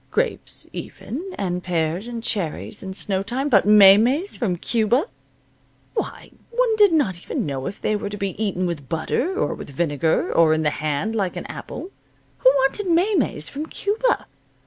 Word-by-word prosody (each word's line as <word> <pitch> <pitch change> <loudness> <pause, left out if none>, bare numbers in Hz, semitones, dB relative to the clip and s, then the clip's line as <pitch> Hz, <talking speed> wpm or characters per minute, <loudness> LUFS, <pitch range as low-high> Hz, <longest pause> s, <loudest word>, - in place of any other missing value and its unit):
Grapes, 485 -1 -2
even, 265 +7 -6 0.2
and 180 -2 -2
pears 170 +3 -1
and 235 -1 -6
cherries 200 0 -2
in 190 - -6
snow 190 0 0
time. 255 +8 -2
But 200 -5 +4
maymeys 215 - +6
from 195 -8 -1
Cuba 230 - +1 0.9
why, 440 - -4 0.2
one 470 -1 +1
did 415 -3 +6
not 210 - +1
even - - -3
know 135 -2 -3
if 195 - -6
they 215 - 0
were 205 -1 -3
to 205 - -6
be 195 -1 -2
eaten 185 -3 -1
with 155 -7 -4
butter, 285 - -1
or - - 0
with - - -9
vinegar, 145 +1 0
or 165 -1 +5
in 160 - -1
the 150 - +3
hand, 155 +9 -2
like 195 -4 -1
an - - -5
apple. 375 - -7 0.5
Who 255 - +6
wanted 270 +10 +1
maymeys 340 - +1
from 300 +3 -5
Cuba? 440 +8 0
205 Hz, 170 wpm, -22 LUFS, 175-290 Hz, 0.9 s, maymeys